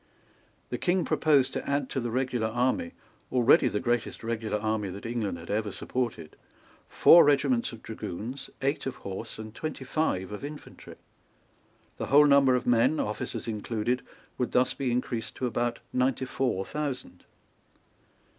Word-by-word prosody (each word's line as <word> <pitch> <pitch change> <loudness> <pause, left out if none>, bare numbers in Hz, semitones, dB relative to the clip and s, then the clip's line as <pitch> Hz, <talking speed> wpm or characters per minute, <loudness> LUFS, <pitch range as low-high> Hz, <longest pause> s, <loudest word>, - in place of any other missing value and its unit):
The - - -3
King 180 0 +1
proposed 145 -4 +3
to - - -4
add 140 -1 0
to - - -1
the 120 -1 -2
regular 125 -2 0
army, 130 - 0 0.4
already 125 +1 +5
the 105 - -1
greatest 120 0 -1
regular 115 -2 -2
army 110 -1 -1
that 100 +4 -8
England 115 -6 -2
had 85 - -8
ever 105 0 -1
supported, 115 -9 -4 0.5
four 170 - +8
regiments 140 -4 +2
of 115 -2 -11
dragoons, 115 +5 -6
eight 140 0 0
of 130 - -3
horse, 95 -1 -7
and 110 0 -8
twenty 155 0 -5
five 105 -11 -1
of 105 - -7
infantry. 145 +1 -9 1.0
The - - -4
whole 145 +2 +7
number 140 -2 +5
of 125 - -1
men, 125 +5 +3
officers 105 +2 -3
included, 115 +2 -1 0.4
would 125 - -1
thus 125 +1 +3
be 135 -3 -2
increased 120 -2 -2
to 130 - -3
about 120 0 -1 0.2
ninety 130 +1 +1
four 125 -7 -1
thousand. 145 -4 -5
125 Hz, 155 wpm, -28 LUFS, 110-135 Hz, 1.0 s, four